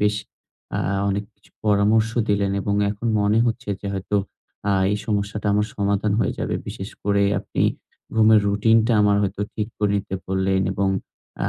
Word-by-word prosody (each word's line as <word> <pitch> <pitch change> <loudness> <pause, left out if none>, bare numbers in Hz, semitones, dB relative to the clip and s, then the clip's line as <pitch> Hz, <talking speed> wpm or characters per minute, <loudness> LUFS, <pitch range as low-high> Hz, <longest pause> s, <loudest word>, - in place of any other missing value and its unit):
বেশ 105 0 +2 0.6
আ - - -1 0.3
অনেক 100 +1 -1
কিছু - - -27
পরামর্শ 105 +2 +3 0.2
দিলেন। 100 -1 +1
এবং 100 +1 -1 0.2
এখন 105 +3 -5
মনে 105 +2 +3
হচ্ছে 115 -1 -3
যে, 100 - -6
হয়তো 95 +2 -2 0.5
আ - - +3 0.2
এই - - +1
সমস্যাটা 105 0 -2
আমার 105 +1 +2
সমাধান 100 0 +1
হয়ে - - +1
যাবে। - - -2
বিশেষ 95 +2 -6
করে 100 0 +2 0.2
আপনি - - -2 0.5
ঘুমের 110 -1 +6
রুটিন 105 +3 +3
টা 120 - +2
আমার 100 0 +4
হয়তো 100 0 -2
ঠিক 105 0 -2
করে 105 -1 +1
নিতে 95 -1 -4
বললেন। 95 0 +1
এবং 100 0 0 0.6
আ - - +1
105 Hz, 170 wpm, -22 LUFS, 100-105 Hz, 0.6 s, ঘুমের